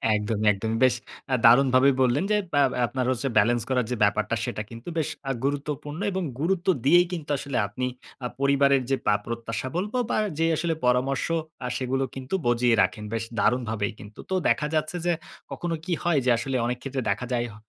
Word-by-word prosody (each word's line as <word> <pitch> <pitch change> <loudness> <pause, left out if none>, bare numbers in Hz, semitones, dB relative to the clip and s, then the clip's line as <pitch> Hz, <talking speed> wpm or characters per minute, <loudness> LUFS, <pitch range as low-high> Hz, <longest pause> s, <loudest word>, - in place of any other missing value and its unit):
একদমই, 105 0 -1
একদমই। 110 +3 -2
বেশ 125 -1 +3 0.4
আ - - +5
দারুণভাবে 130 +2 +6
বললেন, 130 +6 +3
যে 210 - +4 0.2
ব্য - - +2 0.3
আপনার 130 +1 -2
হচ্ছে 130 +2 -1
ব্যালেন্স 120 +2 +3
করার 125 -3 +1
যে - - +1
ব্যাপারটা 105 +2 +1
সেটা - - -3
কিন্তু 115 +8 -8
বেশ 155 - -1 0.2
আ - - +2
গুরুত্বপূর্ণ। 145 +2 -3
এবং 190 -1 -2 0.2
গুরুত্ব 180 +2 0 0.2
দিয়েই 175 +4 +6
কিন্তু 160 -5 -5
আসলে 140 -1 -4
আপনি 125 +5 -3 0.4
আ - - +1
পরিবারের 140 -1 +4
যে 135 - +4
বা 105 - +5
প্রত্যাশা 115 +1 -4
বলব 205 +6 -2 0.2
বা - - +1 0.2
যে 165 - +3
আসলে 165 0 0
পরামর্শ 125 +2 +1 0.4
আ - - -1
সেগুলো 130 +1 -1
কিন্তু 135 +6 -3
বজিয়ে 120 0 +3
রাখেন। 105 - -2
বেশ 115 0 -1 0.2
দারুণভাবেই 110 -4 0
কিন্তু। 105 +1 -12
তো - - +2
দেখা 150 - +2
যাচ্ছে 155 +3 -1
যে, 175 - +3 0.4
কখনো 175 -1 -3
কি 180 - -1
হয় 175 -4 +3
যে 125 - +3
আসলে 135 +3 -3
অনেক 125 +1 -1
ক্ষেত্রে 135 -1 -3
দেখা 110 +5 -2
যায় 120 0 0
হ - - -13
130 Hz, 195 wpm, -25 LUFS, 115-145 Hz, 0.4 s, দারুণভাবে